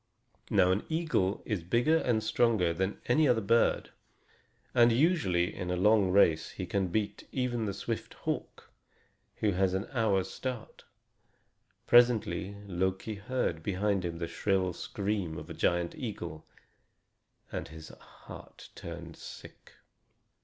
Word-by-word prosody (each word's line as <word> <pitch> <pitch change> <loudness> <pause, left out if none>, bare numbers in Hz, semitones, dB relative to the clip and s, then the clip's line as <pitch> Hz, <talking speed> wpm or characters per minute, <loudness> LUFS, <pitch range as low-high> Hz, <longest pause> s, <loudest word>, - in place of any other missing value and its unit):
Now 95 -2 +4
an 100 +3 0
eagle 160 - 0
is 105 -5 -2
bigger 120 - +3
and 115 -8 +1
stronger 110 -7 +2
than 95 +4 -2
any 150 +5 +3
other 120 -3 +3
bird, 115 +3 +2 0.8
and 120 -1 +6
usually 115 - +2
in 90 -2 -5
a 90 - 0
long 105 +1 +4
race 85 -5 +4
he 95 - -6
can 95 +1 0
beat 100 +3 -2
even 120 -3 -1
the 100 - -2
swift - - -4
hawk - - -5 0.7
who 105 - +3
has 95 0 +1
an 95 - -2
hour's 105 -7 +1
start. 125 -4 -6 1.0
Presently 110 -6 +4
Loki 95 +3 -2
heard 100 -5 -2
behind 100 +2 0
him 85 -1 -3
the 85 0 -3
shrill 95 -1 0
scream 95 -3 -3
of 75 - -8
a - - -4
giant 85 0 0
eagle, 80 0 -6 1.0
and - - -4
his 80 +1 -11
heart - - -13
turned 85 -1 -8
sick. - - -12
100 Hz, 135 wpm, -30 LUFS, 90-115 Hz, 1.0 s, and